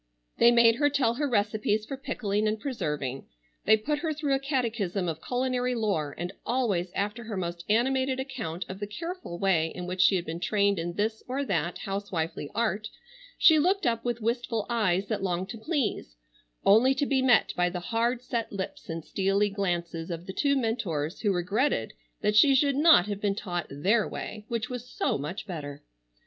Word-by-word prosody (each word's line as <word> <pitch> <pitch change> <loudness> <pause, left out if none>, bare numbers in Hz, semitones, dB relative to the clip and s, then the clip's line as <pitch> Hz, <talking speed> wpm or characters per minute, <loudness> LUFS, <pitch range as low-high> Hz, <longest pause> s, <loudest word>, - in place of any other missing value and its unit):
They 235 - +7
made 235 -1 +5
her 290 +1 +3
tell 265 -5 +2
her 285 +3 -1
recipes 215 -1 +1
for 275 - -5
pickling 215 -6 -1
and 215 0 -1
preserving. 150 - -3 0.4
They 220 +1 +6
put 295 +7 -2
her 320 0 -1
through 290 -2 0
a 270 - +2
catechism 230 - -1
of 160 -1 -3
culinary 250 0 -1
lore, 195 -11 -1
and 175 +3 -4
always 200 -9 0
after 210 +3 -2
her 215 -3 -4
most 170 -1 -4
animated 260 +4 +2
account 230 - -4
of 190 +1 -7
the 205 - -4
careful 335 - -6
way 175 -4 +2
in 180 +2 -6
which 180 +1 -1
she 195 - +6
had 175 -2 -1
been 165 +1 -5
trained 200 +1 +1
in 170 +1 -3
this 215 +3 -1
or 270 +3 -2
that 175 - -1
housewifely 190 -7 -3
art 220 -2 0 0.5
she 315 -2 +7
looked 375 +4 +2
up 230 -1 +1
with 240 -1 -2
wistful 230 -1 -1
eyes 195 -5 +1
that 215 -3 -2
longed 185 0 -2
to 225 - -7
please, 245 - -2 0.5
only 240 +7 +6
to 285 - +1
be 270 -1 +2
met 250 -3 +4
by 180 0 +2
the 180 0 -4
hard 235 +6 -1
set 235 -3 -3
lips 190 -2 -6
and 165 -1 -5
steely 195 +4 +1
glances 175 -4 -2
of 170 0 -5
the 190 - -6
two 280 +6 +2
mentors 200 - -1
who 205 - +2
regretted 200 +10 0 0.3
that 210 0 +1
she 270 +5 +7
should 280 +1 +3
not 300 - +6
have 205 -1 -4
been 200 -1 +1
taught 175 -3 -3
their 195 +10 +1
way 210 -1 -6
which 230 -2 -2
was 250 0 -6
so - - -1
much 175 +8 -5
better. 145 -7 -7
210 Hz, 190 wpm, -28 LUFS, 180-250 Hz, 0.5 s, They